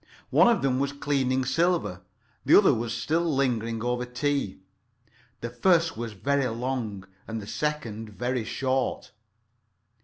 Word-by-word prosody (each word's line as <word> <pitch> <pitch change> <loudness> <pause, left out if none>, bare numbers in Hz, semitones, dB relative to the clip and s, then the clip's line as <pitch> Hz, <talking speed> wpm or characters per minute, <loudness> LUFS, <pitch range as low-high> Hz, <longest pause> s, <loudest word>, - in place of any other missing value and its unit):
One - - +6
of 235 -10 +3
them 130 -1 +2
was 140 +1 -1
cleaning 130 -2 0
silver, 165 - +1 0.4
the - - +7
other - - +6
was 115 0 -2
still 160 +7 0
lingering 120 -8 0
over 125 0 0
tea. 125 -4 -2 0.8
The 120 - -4
first 165 +5 +3
was 115 -1 -5
very 140 +6 0
long, 115 -4 -3 0.2
and 115 0 -4
the 105 - -8
second 115 -5 -3
very 120 +3 -2
short. 130 +3 -1
130 Hz, 140 wpm, -27 LUFS, 115-140 Hz, 0.8 s, the